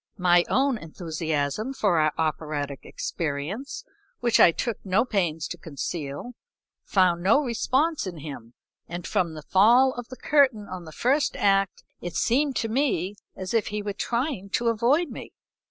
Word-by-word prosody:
My 175 -2 +4
own 265 -2 +2
enthusiasm 160 - -3
for 195 -9 +2
our 155 0 +3
operatic 150 -3 -2
experience, 170 - -4 0.3
which 235 -1 +2
I 170 - +8
took 230 +6 -3
no 195 +5 +2
pains 175 -9 -1
to 175 - -6
conceal, 150 - -5 0.5
found 180 -3 +2
no 205 +10 +5
response 265 +3 0
in 175 -3 -6
him, 140 -6 -9 0.3
and 175 +1 -6
from 170 -3 0
the 155 - -8
fall 240 +10 +5
of 245 -1 -7
the 255 - -10
curtain 260 -9 +3
on 185 -2 -7
the 160 - -10
first 270 - +1
act 195 -1 +2 0.2
it 175 -1 -6
seemed 275 +3 +2
to 225 - 0
me 220 - 0 0.2
as 185 +2 -5
if 225 -2 +2
he 210 0 -3
were 205 -1 -3
trying 235 -2 -2
to 235 0 +2
avoid 255 +9 +2
me. - - -9
195 Hz, 160 wpm, -26 LUFS, 165-245 Hz, 0.5 s, I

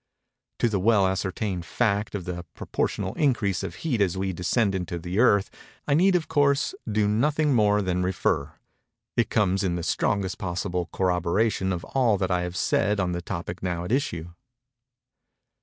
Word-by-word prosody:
—To - - +2
the 105 -4 0
well 100 0 +4
ascertained 95 0 -2
fact 105 +3 0
of 95 -4 -4
the 90 -1 -4
proportional 95 -1 -2
increase 115 - +1
of - - -5
heat 125 -9 +1
as 95 -2 +1
we 95 0 -1
descend 95 +4 +1
into 90 -2 -3
the 90 +4 -3
Earth, 100 -5 +4 0.4
I 145 - +2
need 180 +5 +4
of 170 -3 0
course, 145 -2 +2 0.2
do 105 0 +2
nothing 145 +7 +2
more 105 -3 +3
than 90 -1 0
refer:—it 95 +4 -3
comes 100 -2 +1
in 90 -2 0
the 85 - -3
strongest 95 +1 0
possible 90 -1 -2
corroboration 95 +2 +1
of 90 -2 -3
all 120 -6 +2
that 95 -1 -1
I 90 0 +2
have 90 0 -4
said 105 +3 +1
on 90 -2 0
the 85 0 -3
topic 85 0 -5
now 90 -2 -2
at 90 - -5
issue. 90 - -1
95 Hz, 170 wpm, -25 LUFS, 90-115 Hz, 0.4 s, well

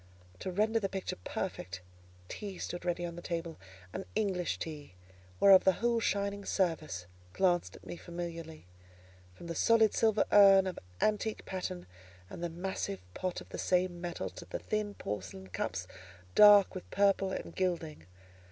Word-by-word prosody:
To - - -4
render 215 +5 +2
the 195 -3 -2
picture 190 -1 -4
perfect, 90 +2 -4 0.5
tea 200 - -6
stood 175 0 -5
ready 175 0 -1
on 170 -1 -6
the 175 - -7
table—an 160 - -6
English 195 -5 0
tea, 150 - -7 0.4
whereof 195 -1 +8
the 190 - +5
whole 235 +3 +1
shining 200 -2 -1
service 165 - -1 0.3
glanced 180 -2 +1
at - - -15
me 175 - -6
familiarly; 170 - -7 0.7
from - - -11
the 170 - -4
solid 220 +4 +4
silver 220 -2 +3
urn, 195 -2 +8
of 185 - -4 0.2
antique 215 0 0
pattern, 135 - -4 0.5
and 170 - -7
the 175 - -1
massive 170 - -4
pot 185 -1 -3
of - - -14
the - - -6
same 180 -1 +1
metal, 175 -1 -4
to - - -10
the - - -4
thin 210 - -2
porcelain 95 -2 -6
cups, 90 0 -3 0.5
dark 205 -1 +8
with 185 - -8
purple 195 -1 +2
and - - -5
gilding. 165 - -2
180 Hz, 155 wpm, -32 LUFS, 165-200 Hz, 0.7 s, whereof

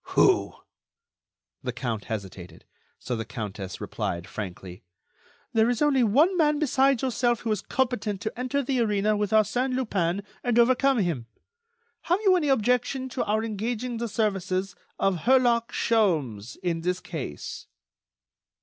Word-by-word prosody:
"Who?" 380 -2 +4 1.1
The 130 - -3
Count 120 -4 -4
hesitated, 95 -6 -7 0.3
so 125 - -4
the 115 - -3
Countess 105 -4 -6
replied, 85 0 -3
frankly: 90 -2 -7 0.7
"There 225 +1 +4
is 245 - 0
only 285 -4 +3
one 290 - +4
man 300 -3 +3
besides 275 -3 +2
yourself 240 -2 +1
who 225 - -2
is 210 - 0
competent 235 -6 -1
to 220 - -3
enter 255 +3 -1
the 260 -1 0
arena 210 -2 +2
with 205 -1 -1
Arsène 220 +5 +2
Lupin 200 -7 -1 0.2
and 245 -2 +1
overcome 255 +3 +4
him. 165 - -1 0.8
Have 355 +3 +3
you 380 -1 +6
any 330 -5 +1
objection 255 +1 +1
to 255 - -2
our 215 +1 +1
engaging 230 +3 -3
the 235 +1 -2
services 195 -3 -1 0.2
of 190 -4 0
Herlock 240 -2 +3
Sholmes 150 - 0
in 170 -2 -1
this 180 +2 -1
case?" 140 - -6
220 Hz, 140 wpm, -26 LUFS, 165-250 Hz, 1.1 s, you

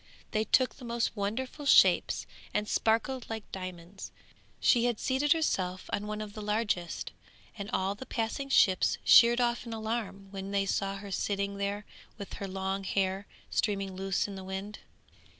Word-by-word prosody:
They 215 0 +1
took 255 +2 +3
the - - -12
most 235 -1 -1
wonderful 255 +8 -3
shapes, - - +5 0.3
and 210 0 +1
sparkled 230 +4 +1
like 220 -1 -4
diamonds. 185 0 -7 0.5
She 240 -2 +4
had 240 -3 0
seated 275 +3 +1
herself 185 - -1
on 205 +1 -1
one 210 0 -3
of 210 -1 -7
the 215 - -7
largest, 210 -4 -1 0.4
and 200 -1 -6
all 190 +1 0
the 260 +6 -10
passing 235 +5 -2
ships 190 -8 +4
sheered 235 +1 +7
off 240 -1 +1
in 230 - -5
alarm 220 -3 -4
when 195 -1 -6
they 200 0 +1
saw 195 0 -1
her 200 0 -8
sitting 200 +1 -1
there 200 +1 -2 0.3
with 200 -3 -8
her 200 - -2
long 190 +1 -2
hair 195 +1 -1 0.2
streaming 195 -3 0
loose 195 +1 0
in 200 - -7
the 190 -1 -7
wind. 190 +2 -5
205 Hz, 170 wpm, -30 LUFS, 195-230 Hz, 0.5 s, sheered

